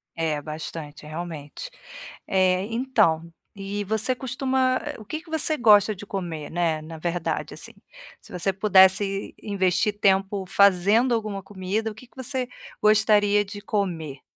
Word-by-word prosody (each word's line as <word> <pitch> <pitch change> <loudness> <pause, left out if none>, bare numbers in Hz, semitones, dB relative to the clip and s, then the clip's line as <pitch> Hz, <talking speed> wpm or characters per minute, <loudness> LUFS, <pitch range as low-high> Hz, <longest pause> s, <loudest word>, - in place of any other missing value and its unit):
É, 155 -3 -1
bastante, 155 -1 -7
realmente. 160 - -7 0.6
Eh, 185 0 +2
então, 210 -10 +1 0.2
e 200 +1 -4
você 220 +5 0
costuma 260 0 0
eh, 295 - -5
o 215 - -11
que 310 +7 -5
que 340 - -19
você 315 -1 +2
gosta 210 -3 +5
de 205 +2 -10
comer, 170 -7 -5
né, 165 -2 0
na 160 +1 -9
verdade 170 +1 -3
assim? - - -9 0.5
Se - - -17
você 180 +2 -1
pudesse 195 0 +3
investir 200 0 0
tempo 195 0 +2
fazendo 200 +6 +4
alguma 210 -3 -3
comida, 205 +3 -3
o - - -12
que 245 +2 -14
que - - -33
você 260 0 -3 0.3
gostaria 210 -1 +4
de 205 +1 -9
comer? 170 -10 -3
200 Hz, 145 wpm, -24 LUFS, 175-220 Hz, 0.6 s, gosta